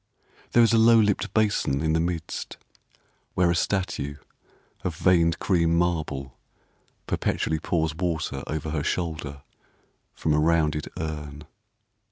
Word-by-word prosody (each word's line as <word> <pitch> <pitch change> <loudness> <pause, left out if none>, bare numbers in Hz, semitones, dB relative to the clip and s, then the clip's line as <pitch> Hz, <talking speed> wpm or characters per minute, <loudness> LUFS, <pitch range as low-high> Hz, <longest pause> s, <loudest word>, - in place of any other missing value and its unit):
There 120 - +6
is 115 - +4
a 115 - +5
low 115 +1 +7
lipped 105 -2 +1
basin 100 -10 +1
in 80 0 +1
the 80 - +2
midst, 85 -1 -3 0.8
Where 90 -1 +3
a - - +1
statue 85 -6 -1 0.7
of 85 - -2
veined 85 -1 +3
cream 85 -3 +2
marble 75 -7 -2 0.7
Perpetually 80 0 -1
pours 80 -1 0
water 80 -5 -2
over 75 0 -3
her 75 -2 -1
shoulder 80 -5 -3 0.7
From 80 - 0
a 75 - +3
rounded 75 -2 +2
urn. 75 -2 -5
80 Hz, 130 wpm, -25 LUFS, 75-90 Hz, 0.8 s, low